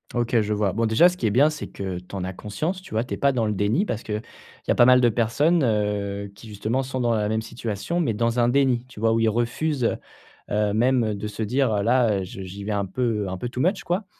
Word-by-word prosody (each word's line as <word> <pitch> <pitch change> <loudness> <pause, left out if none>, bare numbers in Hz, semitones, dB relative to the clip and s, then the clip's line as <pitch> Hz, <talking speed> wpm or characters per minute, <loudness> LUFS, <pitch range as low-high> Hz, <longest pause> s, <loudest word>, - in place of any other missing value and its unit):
OK 120 -1 +2
je 105 0 -1
vois. 105 -3 0
Bon 115 +1 +1
déjà, 110 +11 +6
ce 180 0 -2
qui 115 - 0
est - - +2
bien, 140 +9 +4
c'est 150 - -6
que 95 -2 -5
tu 90 +2 -11
en 95 - -3
as 95 0 -4
conscience, 155 - -4
tu 110 - -9
vois? 110 - +2
Tu 125 - -6
es - - -3
pas 140 0 +3
dans 120 -4 0
le 105 - 0
déni 105 - +1
parce 110 - -3
que, 110 - -5
il 105 - -2 0.5
y - - +2
a - - +3
pas 120 - +6
mal 125 0 +6
de 120 - +5
personnes, 145 +10 +2
heu, 100 -3 -1
qui 110 +2 -13
justement 110 +5 -2
sont 130 0 -4
dans 120 -1 +1
la 105 -2 0
même 110 0 -1
situation, 115 - -4
mais 145 -10 +1
dans 115 +3 0
un 120 0 +3
déni, 130 -2 +2
tu 115 - -13
vois? 115 0 +2
Où 115 - +2
ils 115 - +3
refusent, 120 +4 0 0.5
heu, 105 0 +1
même 120 -1 +2
de 105 +1 -5
se 105 +1 -4
dire, 125 +2 +1
heu, 100 -1 0
là, 115 -5 +2
heu, - - -3
j 95 +1 -8
j'y 100 +2 -8
vais 105 - -3
un 100 -1 0
peu, 115 0 -1
heu, - - -4
un 95 - -4
peu 120 - -4
too 125 +1 -4
much 180 +4 +1
quoi, 185 +4 -1
115 Hz, 290 wpm, -24 LUFS, 105-125 Hz, 0.5 s, déjà